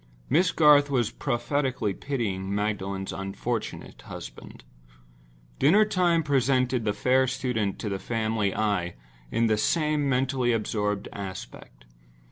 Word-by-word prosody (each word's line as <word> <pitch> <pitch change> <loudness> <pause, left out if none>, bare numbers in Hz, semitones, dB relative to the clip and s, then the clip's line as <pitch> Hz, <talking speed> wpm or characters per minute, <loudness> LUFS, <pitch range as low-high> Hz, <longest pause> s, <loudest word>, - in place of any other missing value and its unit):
Miss 175 +6 +4
Garth 145 -3 +5
was 125 -5 +1
prophetically 130 -4 -1
pitying 100 -7 -3
Magdalen's 100 -2 -2
unfortunate 100 +4 -4
husband. - - -10 1.0
Dinner 200 +10 +5
time 175 -5 +2
presented 130 -3 +1
the 105 - +1
fair 130 +4 +2
student 125 -6 -1
to - - -5
the 100 -1 -2
family 110 -2 -1
eye 100 -5 0 0.3
in 115 - +1
the 110 -1 +2
same 150 +3 +1
mentally 130 -1 +1
absorbed 105 -2 -1
aspect. 95 -11 -9
120 Hz, 115 wpm, -26 LUFS, 105-140 Hz, 1.0 s, Garth